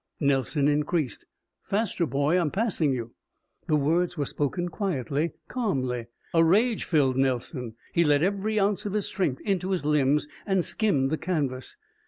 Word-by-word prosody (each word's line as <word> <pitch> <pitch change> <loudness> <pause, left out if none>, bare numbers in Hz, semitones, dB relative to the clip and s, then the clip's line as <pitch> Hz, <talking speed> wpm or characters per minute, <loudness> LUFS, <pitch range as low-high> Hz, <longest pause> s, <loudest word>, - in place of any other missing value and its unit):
Nelson 140 0 +1
increased. 150 - 0 0.3
"Faster, 200 -5 -1
boy, 140 +5 +1
I'm 160 - 0
passing 190 -6 +2
you." 120 -3 -4 0.5
The 155 - +3
words 165 +5 +1
were 145 - 0
spoken 160 +6 -2
quietly, 160 - -2
calmly. 130 - -2 0.3
A 165 -1 +5
rage 215 +7 +3
filled 135 -6 +2
Nelson. 125 -2 -1 0.2
He 170 - +4
let 145 -1 +3
every 200 +3 0
ounce 205 +1 +1
of 200 - -4
his 210 -2 0
strength 165 -10 -1
into 190 -3 -1
his 185 -6 -1
limbs 150 0 +2 0.2
and 190 -4 +1
skimmed 150 -12 +1
the 155 - -1
canvas. 140 -8 -2
155 Hz, 155 wpm, -26 LUFS, 135-190 Hz, 0.5 s, A